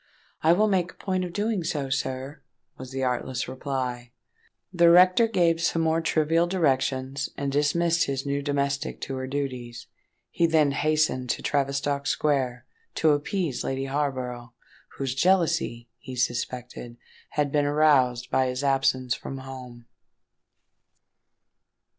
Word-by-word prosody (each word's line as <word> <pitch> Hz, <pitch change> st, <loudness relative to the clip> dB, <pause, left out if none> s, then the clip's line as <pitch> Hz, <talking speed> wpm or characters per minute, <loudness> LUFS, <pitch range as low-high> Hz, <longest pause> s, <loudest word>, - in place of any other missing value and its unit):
"I 160 Hz, -, +4 dB
will 210 Hz, +4 st, +3 dB
make 185 Hz, -3 st, 0 dB
a -, -, -32 dB
point 185 Hz, -2 st, -2 dB
of 180 Hz, -, -5 dB
doing 205 Hz, 0 st, -1 dB
so, 145 Hz, -4 st, -3 dB
sir," 135 Hz, +2 st, -3 dB, 0.3 s
was 130 Hz, 0 st, -9 dB
the 135 Hz, 0 st, -3 dB
artless 125 Hz, 0 st, -2 dB
reply. 130 Hz, -2 st, -4 dB, 0.6 s
The 170 Hz, -1 st, +5 dB
rector 185 Hz, +6 st, +6 dB
gave 170 Hz, -6 st, +2 dB
some 165 Hz, 0 st, +1 dB
more 160 Hz, 0 st, +2 dB
trivial 165 Hz, +1 st, +2 dB
directions, 135 Hz, -5 st, 0 dB
and 140 Hz, -1 st, -2 dB
dismissed 165 Hz, +4 st, +2 dB
his 135 Hz, 0 st, -3 dB
new 140 Hz, 0 st, -1 dB
domestic 140 Hz, -1 st, -2 dB
to 135 Hz, -, -4 dB
her 130 Hz, 0 st, -4 dB
duties. 130 Hz, -4 st, -4 dB, 0.5 s
He 170 Hz, -, +2 dB
then 155 Hz, -3 st, +3 dB
hastened 155 Hz, -3 st, +1 dB
to -, -, -1 dB
Tavistock 140 Hz, 0 st, -1 dB
Square, 130 Hz, -6 st, 0 dB, 0.3 s
to 160 Hz, -, +3 dB
appease 150 Hz, -, -1 dB
Lady 135 Hz, 0 st, -2 dB
Harborough, 130 Hz, -4 st, -3 dB, 0.4 s
whose 135 Hz, -3 st, -2 dB
jealousy, 165 Hz, -7 st, +1 dB
he 130 Hz, -, -8 dB
suspected, 120 Hz, 0 st, -3 dB, 0.4 s
had 145 Hz, -2 st, +1 dB
been 145 Hz, 0 st, +2 dB
aroused 140 Hz, -5 st, +3 dB
by 130 Hz, 0 st, +2 dB
his 125 Hz, +2 st, -3 dB
absence 135 Hz, -2 st, +1 dB
from 135 Hz, -, -6 dB
home. 130 Hz, -3 st, -10 dB
140 Hz, 135 wpm, -26 LUFS, 130-160 Hz, 0.6 s, rector